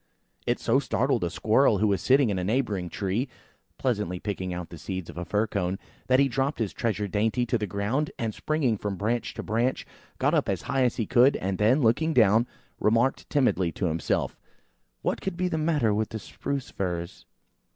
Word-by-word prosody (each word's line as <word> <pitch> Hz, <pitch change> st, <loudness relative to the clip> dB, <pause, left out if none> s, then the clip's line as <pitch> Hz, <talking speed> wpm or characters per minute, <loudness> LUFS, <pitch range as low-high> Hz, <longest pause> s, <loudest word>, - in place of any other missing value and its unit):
It -, -, +1 dB
so -, -, +3 dB
startled -, -, 0 dB
a -, -, 0 dB
squirrels -, -, +3 dB
who 110 Hz, -, +3 dB
was 100 Hz, -2 st, +1 dB
sitting 130 Hz, -3 st, +4 dB
in 95 Hz, -, -1 dB
a -, -, -2 dB
neighbouring 105 Hz, -4 st, 0 dB
tree, 105 Hz, +9 st, -2 dB, 0.5 s
pleasantly 105 Hz, -8 st, -1 dB
picking 95 Hz, -2 st, -3 dB
out 90 Hz, -1 st, -5 dB
the 85 Hz, -, -10 dB
seeds 95 Hz, -1 st, -5 dB
of -, -, -15 dB
a -, -, -3 dB
fir 105 Hz, +6 st, +1 dB
cone, 95 Hz, -3 st, -2 dB, 0.3 s
that 130 Hz, 0 st, +4 dB
he 140 Hz, -, +5 dB
dropped 135 Hz, +3 st, -1 dB
his 110 Hz, -4 st, -2 dB
treasured 105 Hz, -3 st, -2 dB
dainty 110 Hz, +4 st, +1 dB
to 120 Hz, -, 0 dB
the 105 Hz, -2 st, -1 dB
ground 105 Hz, -, -1 dB
and 115 Hz, -2 st, -2 dB
springing 135 Hz, -8 st, 0 dB
from 100 Hz, -2 st, -3 dB
branch 115 Hz, +5 st, -2 dB
to 115 Hz, -, -5 dB
branch, 115 Hz, +4 st, 0 dB, 0.3 s
got -, -, +2 dB
up -, -, +2 dB
as -, -, -1 dB
high 135 Hz, -1 st, +1 dB
as 125 Hz, -, +1 dB
he 115 Hz, -, -1 dB
could, 125 Hz, +5 st, +5 dB
and 95 Hz, 0 st, -2 dB
then, 115 Hz, +8 st, +4 dB
looking 140 Hz, +7 st, +2 dB
down, 110 Hz, 0 st, +5 dB, 0.3 s
remarked 115 Hz, +5 st, +2 dB
timidly 110 Hz, -, +2 dB
to 95 Hz, -, -2 dB
himself, 80 Hz, -2 st, -1 dB, 0.6 s
"What -, -, -1 dB
can 190 Hz, -2 st, -3 dB
be 180 Hz, +1 st, 0 dB
the 160 Hz, -3 st, -1 dB
matter 150 Hz, -9 st, +2 dB
with 110 Hz, +1 st, 0 dB
the 110 Hz, -, -4 dB
Spruce 135 Hz, +6 st, -5 dB
firs?" 85 Hz, -2 st, -4 dB
110 Hz, 205 wpm, -27 LUFS, 95-130 Hz, 0.6 s, he